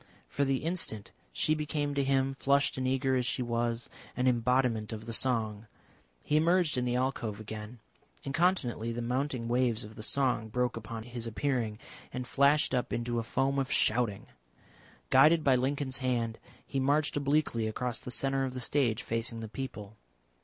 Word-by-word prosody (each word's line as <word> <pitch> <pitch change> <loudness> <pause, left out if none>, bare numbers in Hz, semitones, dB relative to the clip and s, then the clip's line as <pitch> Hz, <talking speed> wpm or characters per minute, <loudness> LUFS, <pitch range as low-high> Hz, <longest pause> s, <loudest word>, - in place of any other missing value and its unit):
For 140 - -1
the 135 0 0
instant 160 - -2 0.2
she - - +1
became 150 -1 -2
to 140 0 +1
him, 135 0 +1
flushed 140 +1 +2
and 130 0 -1
eager 130 0 +1
as 125 - +1
she 125 - 0
was, 115 0 -1 0.3
an 125 0 +2
embodiment 120 -2 +2
of 110 0 -6
the 115 - -5
song. 110 -3 0 0.6
He 150 - +2
emerged 170 0 +3
in 125 -1 0
the 125 0 0
alcove 125 -5 -1
again. 110 +2 -7 0.5
Incontinently 135 - 0
the 120 +1 -3
mounting 125 0 -1
waves 120 -1 +1
of 105 +1 -10
the 110 - -9
song 120 -2 +1
broke 125 +2 0
upon 115 0 -6
his 120 0 -6
appearing, 115 -2 -1 0.3
and 125 0 -4
flashed 140 +3 +3
up 125 - 0
into 120 0 -1
a - - -2
foam 135 +4 0
of 135 - -2
shouting. 110 -3 +2 0.9
Guided 155 +4 +6
by 135 -3 +5
Lincoln's 130 +1 -1
hand 120 -3 -1 0.3
he 135 - -2
marched 145 +3 +2
obliquely 140 -5 +1
across 120 +2 -3
the - - -8
centre 135 +2 +1
of 130 -1 -3
the - - -3
stage 125 -3 0
facing 115 0 -2
the 110 - -5
people. 110 -3 -7
125 Hz, 175 wpm, -30 LUFS, 115-135 Hz, 0.9 s, Guided